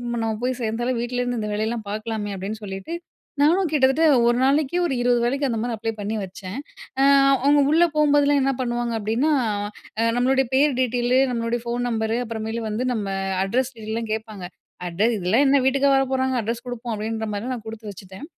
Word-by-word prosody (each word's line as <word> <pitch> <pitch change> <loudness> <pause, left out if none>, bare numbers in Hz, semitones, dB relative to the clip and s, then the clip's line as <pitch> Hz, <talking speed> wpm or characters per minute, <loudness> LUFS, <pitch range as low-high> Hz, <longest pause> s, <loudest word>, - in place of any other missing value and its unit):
நம்ம 225 -1 -1
போய் 255 0 -1
சேர்ந்தாலும். 240 +3 -1
வீட்லருந்து 245 -1 -2
இந்த 210 - -3
வேலையெல்லாம் 220 0 -2
பார்க்கலாமே 215 -1 -4
அப்படின்னு 210 +4 -5
சொல்லிட்டு 195 +9 -6 0.5
நானும் 340 +4 +3
கிட்டத்தட்ட 275 +2 +3 0.2
ஒரு 240 0 +3
நாளைக்கு 280 +3 +2
ஒரு 300 - -1
20 245 -1 +3
வேலைக்கு 275 +4 0
அந்த 235 -3 -1
மாரி 240 +1 -2
அப்ளை 225 +1 -2
பண்ணி 210 +1 -3
வச்ச. 190 +1 -8 1.0
அவங்க 290 +1 +5
உள்ள 330 +2 +5
போகும்போதெல்லாம் 290 -1 +4
என்ன 270 +1 +2
பண்ணுவாங்க. 240 -1 -1
அப்படின்னா, 225 +9 0 0.9
நம்மளுடைய 265 +2 +2
பேர் 275 0 +3
டீட்டெயிலு, 250 +1 +2
நம்மளுடைய 230 0 -1
ஃபோன் 240 +1 -2
நம்பரு 220 0 -1
அப்புறமேல 225 0 -4
வந்து 225 +4 -2
நம்ம 195 -3 -2 0.3
அட்ரஸ் 255 +6 -1
டீடெயில் 220 -2 -7
எல்லா 230 0 -2
கேட்பாங்க. 215 -4 -6 0.4
அட 175 +3 -4 0.2
இதெல்லாம் 200 +9 +2
என்ன 280 - +5
வீட்டுக்கா 275 +1 +3
வரப்போறாங்க 260 -1 +1
அட்ரஸ் 230 +2 -4
குடுப்போம். 245 -1 -4
அப்படீன்ற 220 +1 -3
மாரி 215 +5 -3
நான் 230 -3 -7
குடுத்து 220 -1 -7
வச்சுட்டேன். 190 +6 -11
240 Hz, 170 wpm, -23 LUFS, 220-260 Hz, 1.0 s, அவங்க